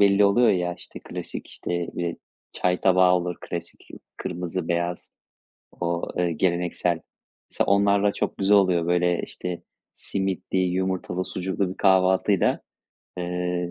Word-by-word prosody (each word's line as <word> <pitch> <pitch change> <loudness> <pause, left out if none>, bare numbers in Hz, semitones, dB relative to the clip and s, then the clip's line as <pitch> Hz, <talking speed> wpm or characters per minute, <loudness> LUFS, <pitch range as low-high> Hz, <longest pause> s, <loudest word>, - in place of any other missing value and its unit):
belli 100 0 +5
oluyor 115 +4 +5
ya, 90 -2 0
işte - - -12
klasik, - - -7
işte, - - -6 0.2
eee, 85 -1 -2 0.4
çay 90 0 0
tabağı 90 -1 +5
olur 90 -1 -1
klasik 85 0 -7 0.3
kırmızı 90 0 -4
beyaz 85 0 -2 0.7
o, 85 0 -1
eee, 90 -1 +1
geleneksel. 85 0 0 0.5
S - - 0
onlarla 100 0 +3
çok - - -2
güzel 100 +1 +5
oluyor, 90 -4 +2
böyle, 90 0 +2
işte, 90 -1 -6 0.3
simitli, 95 -1 -2
yumurtalı, 95 0 -1
sucuklu 95 +1 -2
bir - - -9
kahvaltıyla, 95 0 +3 0.6
eee, 90 0 -2
90 Hz, 125 wpm, -25 LUFS, 90-95 Hz, 0.7 s, belli